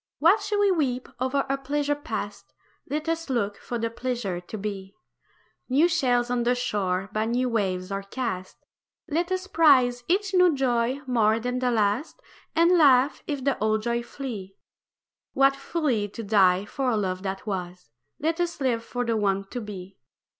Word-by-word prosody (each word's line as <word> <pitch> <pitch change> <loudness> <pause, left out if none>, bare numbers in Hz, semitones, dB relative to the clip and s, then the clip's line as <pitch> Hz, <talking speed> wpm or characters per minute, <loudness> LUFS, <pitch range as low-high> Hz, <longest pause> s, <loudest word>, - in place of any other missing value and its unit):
Why 335 +6 +6
should 415 0 -2
we 405 -1 +4
weep 260 -8 -1
o'er 265 +2 +1
a 275 0 -1
pleasure 290 +2 0
past 290 +2 -6 0.4
Let 300 +2 -2
us 330 -2 -2
look 205 -5 -1
for 240 - -5
the 230 0 -2
pleasure 235 -7 -3
to 200 +5 -8
be. 195 -1 -6 0.7
New 285 +7 +4
shells 250 -8 +1
on 245 -1 +1
the 245 +1 +2
shore 200 -5 -1
by 215 +1 0
new 245 +2 0
waves 190 -4 -1
are 195 0 -2
cast; 195 -3 -4 0.5
Let 345 +3 -1
us 370 0 -1
prize 260 -9 +4
each 385 +2 +1
new 360 -4 +5
joy 255 0 0
more 225 -3 +2
than 250 +2 -2
the 250 -1 +1
last, 225 +5 0 0.4
And 340 +2 +5
laugh 275 -2 +5
if 285 -3 -3
the 275 0 0
old 215 0 +1
joy 235 0 0
flee. 235 -7 -7 0.8
What 275 0 +4
folly 275 -7 -1
to 225 +3 -8
die 195 -2 +4
for 265 +4 -2
a 225 - +1
love 185 -3 -2
that 195 0 -4
was 180 - -5 0.3
Let 325 +3 -1
us 345 -2 -2
live 245 -4 0
for 245 +1 -3
the 230 -1 0
one 195 -2 +1
to 245 - -5
be. 195 -2 -9
245 Hz, 175 wpm, -26 LUFS, 205-285 Hz, 0.8 s, Why